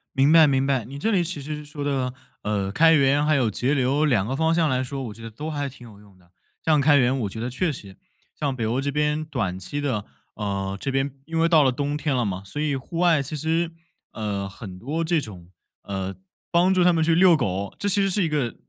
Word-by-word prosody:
明 140 +3 +4
白， 160 -2 +8
明 135 -1 +2
白， 135 -5 0
你 135 +3 -8
这 220 +10 0
里 185 -4 +2
其 170 -2 -4
实 150 +1 -6
说 145 0 -7
的， 135 -3 -1 0.3
呃， 100 -2 -1
开 165 +8 +5
源 140 0 +3
还 155 0 +3
有 125 -5 +2
节 125 +7 0
流 140 +3 +2
两 110 -10 +2
个 130 +5 -2
方 160 +2 +2
向 165 -2 +2
来 130 -2 0
说， 135 +1 -5
我 115 -4 -6
觉 115 - -14
得 115 - -7
都 150 +9 -6
还 145 -2 -2
挺 125 -2 -14
有 105 -2 -15
用 100 -3 -20
的。 90 -1 -26 0.3
像 155 -3 +4
开 145 +1 +5
源 130 0 +3
我 105 - -2
觉 110 - -7
得 120 +2 -3
确 155 +7 -1
实， 100 -8 -10 0.4
像 140 -3 -1
北 115 - -2
欧 120 +5 0
这 140 - -1
边 150 +1 0
短 100 - -3
期 120 +10 -5
的， 120 -8 -2 0.3
呃， 100 -2 -3
这 135 - -3
边 135 +1 0
因 165 +2 -3
为 165 - +4
到 160 -3 +5
了 130 - +3
冬 145 +3 -2
天 150 -1 -1
了 120 -2 +1
嘛， 95 -1 -3
所 145 +10 -5
以 150 -2 0
户 135 +5 -6
外 170 -4 +4
其 140 +3 -5
实， 165 +3 0 0.4
呃， 100 -3 -3
很 95 -2 -10
多 150 - -2
这 165 -1 +1
种， 90 -8 -9 0.3
呃， 95 -1 -4 0.4
帮 180 +2 +4
助 185 - +3
他 180 - +5
们 165 -2 +1
去 165 +1 +3
遛 175 -1 +6
狗， 100 -5 -2
这 205 - -1
其 205 0 +4
实 195 - +2
是 195 0 +2
一 - - +1
个 140 -6 -1
140 Hz, 275 characters per minute, -24 LUFS, 110-155 Hz, 0.4 s, 白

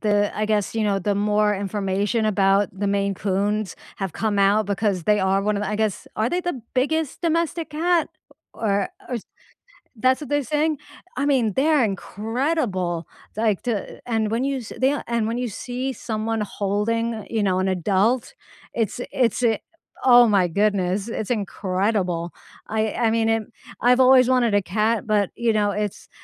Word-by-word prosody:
the 205 -1 +2
I 215 0 0
guess, 210 0 0
you 220 -1 0
know, 200 -1 +1
the 200 +2 0
more 210 +1 +2
information 200 +2 -1
about, 200 -1 +3
the 205 - -1
Maine 200 0 0
Coons, 200 +1 -1 0.2
have 195 -4 -3
come 215 -2 -1
out 200 +1 +3
because 200 -3 0
they 210 0 +3
are 190 +1 +2
one 210 0 0
of 205 - -2
the - - -2
I 210 - -1
guess, 215 -2 -1
are 220 +2 0
they 360 - 0
the 350 -10 -4
biggest 305 +4 0
domestic 335 -1 -1
cat? 335 +2 +1 0.5
Or 200 -3 0 0.2
or 250 - -2 0.8
that's 255 +6 +2
what 295 - -8
they're 290 0 +2
saying? 305 0 0 0.4
I 280 +2 0
mean, 245 -7 +2
they're 290 -2 +3
incredible, 205 - -2 0.3
like 215 -3 +1
to 225 -6 -3
a - - -20
and 220 -3 0
when 235 +4 0
you 275 -2 -1
se 225 - -9
the 260 - +2
yeah, 290 - -1
and 235 -2 0
when 230 +2 -2
you 250 -1 -2
see 250 +5 -4
someone 225 -2 -3
holding, 210 +2 -1
you 220 -2 -1
know, 185 -2 +1
an 190 +1 +1
adult, 195 - +1 0.4
it's 225 0 -2
i - - -4
it's 245 -2 +1
i 225 -2 +3 0.5
oh 245 -2 +8
my 195 -4 +3
goodness, 200 +1 0
it's 220 0 -4
incredible. 190 -4 -1 0.4
I 220 0 0
I 230 -1 +1
mean, 225 0 +1
it 225 0 +2 0.4
I've 250 +1 +4
always 255 -1 +6
wanted 245 -4 +3
a 205 - +3
cat 215 +4 0
but, 210 -3 +1
you 235 -1 +1
know, 205 -1 +2
it's, 210 0 -4
215 Hz, 185 wpm, -23 LUFS, 200-245 Hz, 0.8 s, oh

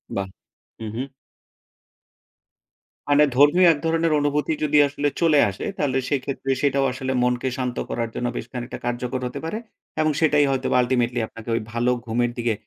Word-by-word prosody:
বাহ! 100 -1 -2 0.5
হু, 110 - -5
হু। 125 - -1 2.1
মানে 145 +1 +6
ধর্মীয় 145 +7 +6
এক 145 - -6
ধরনের 165 0 +1
অনুভূতি 145 +2 0
যদি 150 0 +2
আসলে 145 +1 -2
চলে 160 -3 +4
আসে। 95 - -6
তাহলে 135 -3 0
সেইক্ষেত্রে 135 -1 -2
সেটাও 140 -1 +2
আসলে 130 0 -3
মনকে 125 +1 0
শান্ত 125 -2 -3
করার 115 -1 -2
জন্য 125 - -1
বেশ - - -4
খানিকটা 125 -1 -6
কার্যকর 120 +1 -2
হতে - - -6
পারে। 190 +7 -3 0.4
এবং 155 0 +3
সেটাই 150 -2 +4
হয়তোবা 135 -1 0
আল্টিমেটলি 125 -1 0
আপনাকে 115 +1 -11
ঐ - - +1 0.2
ভালো 120 +1 +1 0.2
ঘুমের 120 +1 0
দিকে 120 -1 0
130 Hz, 160 wpm, -23 LUFS, 120-145 Hz, 2.1 s, মানে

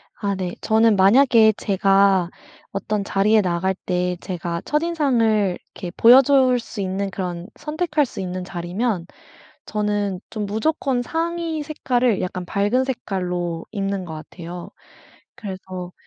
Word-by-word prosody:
아 200 -2 -2
네, 185 -2 -4
저는 220 0 +4
만약에 220 +2 +6
제가 195 -2 +3 0.4
어떤 200 +1 -2
자리에 210 +2 +3
나갈 185 +1 0
때 180 -1 -1
제가 170 -2 -4
첫인상을 250 - +1 0.2
이렇게 180 - -6
보여줄 255 +1 +6
수 230 -2 -7
있는 195 +1 -2
그런 180 -2 -4
선택할 305 -1 -1
수 - - -9
있는 185 -1 -4
자리면 180 +2 -2 0.6
저는 205 -3 -1
좀 215 -2 -3
무조건 250 +4 0
상의 330 +2 -2
색깔을 255 -7 0
약간 185 0 -3
밝은 205 +7 +1
색깔로 180 -9 -3
입는 195 -2 -2
것 160 -2 -7
같아요. 170 +2 -9 0.7
그래서 185 -3 -7
200 Hz, 260 characters per minute, -22 LUFS, 185-245 Hz, 0.7 s, 만약에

